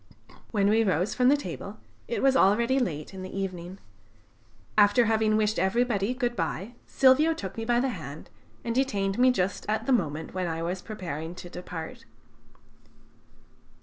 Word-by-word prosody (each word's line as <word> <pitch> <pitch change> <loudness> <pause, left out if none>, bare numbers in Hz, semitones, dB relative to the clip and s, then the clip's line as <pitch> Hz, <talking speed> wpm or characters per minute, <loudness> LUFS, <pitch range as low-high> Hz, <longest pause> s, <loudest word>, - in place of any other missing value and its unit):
When 200 -3 +1
we 220 +2 +4
rose 185 -1 +1
from 250 0 +3
the 290 - +5
table 290 - -7 0.3
it 475 - -2
was 270 -1 +4
already 235 +4 +4
late 155 - -3
in 190 - -7
the 185 +1 -7
evening. 185 -1 -5 1.0
After 210 +3 +5
having 220 -1 +2
wished 215 0 +1
everybody 215 +3 +1
good 245 -2 -1
bye, 185 +6 -3
Silvio 290 +5 +4
took 190 - -6
me 225 - -4
by 240 +1 +2
the 265 +2 +1
hand 155 - -8 0.3
and 230 - -2
detained 205 -6 0
me 255 +1 +6
just 195 -6 0
at 220 +1 0
the 270 - +2
moment 160 -8 -1
when 185 -1 -2
I 165 0 -3
was 180 +2 -3
preparing 170 -6 -6
to 175 -1 -10
depart. 175 -3 -7
205 Hz, 165 wpm, -27 LUFS, 180-245 Hz, 1.0 s, me